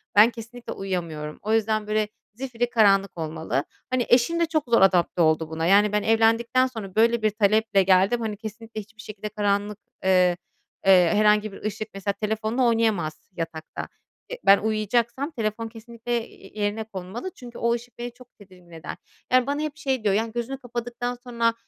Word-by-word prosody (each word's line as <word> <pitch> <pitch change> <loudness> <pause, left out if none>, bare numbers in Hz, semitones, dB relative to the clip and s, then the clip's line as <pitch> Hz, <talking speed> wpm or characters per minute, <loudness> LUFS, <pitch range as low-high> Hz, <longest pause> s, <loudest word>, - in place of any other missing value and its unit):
ben 215 +3 +8
kesinlikle 235 +1 -8
uyuyamıyorum. 165 -6 -4
O 215 +1 -1
yüzden, 215 -1 +1
böyle, 215 0 +1 0.3
zifirî 245 -1 -3
karanlık 200 -5 +3
olmalı. 160 -4 -2 0.3
Hani, 255 -2 0
eşim 255 +8 +4
de 335 - +3
çok 315 -3 -1
zor 230 -4 +4
adapte 180 -2 +3
oldu 160 0 +2
buna. 160 0 -2
Yani, 205 +3 +5
ben 210 0 +1
evlendikten 230 +3 +3
sonra 215 -6 -8
böyle 230 +1 +3
bir 215 - +3
taleple 210 -1 +2
geldim. 195 +5 +3
Hani, 215 -2 -3
kesinlikle 220 0 -7
hiçbir 220 +2 -15
şekilde 210 0 -7
karanlık, 205 0 -1 0.3
eee, 180 -2 +4 0.5
eee, 180 -3 +6
herhangi 210 0 +3
bir - - -11
ışık 215 +1 -4
mesela 195 +1 -2
telefonla 220 +4 -1
oynayamaz 215 -9 0
yatakta. 165 -2 -6 0.4
Eee, - - -5
ben 195 - +8
uyuyacaksam 235 - 0
telefon 225 -2 -3
kesinlikle, 235 +1 -5
eee, 205 +2 -11
yerine 210 +2 -1
konmalı 215 - -7
çünkü 240 -2 -11
o 235 0 +1
ışık 240 +1 -6
beni 240 0 -5
çok 250 0 -16
tedirgin 180 -3 -17
eder. 165 -1 -8 0.3
Yani, 255 0 +4
bana 285 +2 -1
hep 305 0 -4
şey 265 -6 -1
diyor, 205 -2 +2
yani, 225 +1 0
"Gözünü 240 +3 -4
kapadıktan 245 0 -4
sonra 235 -2 +1
220 Hz, 175 wpm, -25 LUFS, 195-235 Hz, 0.5 s, ben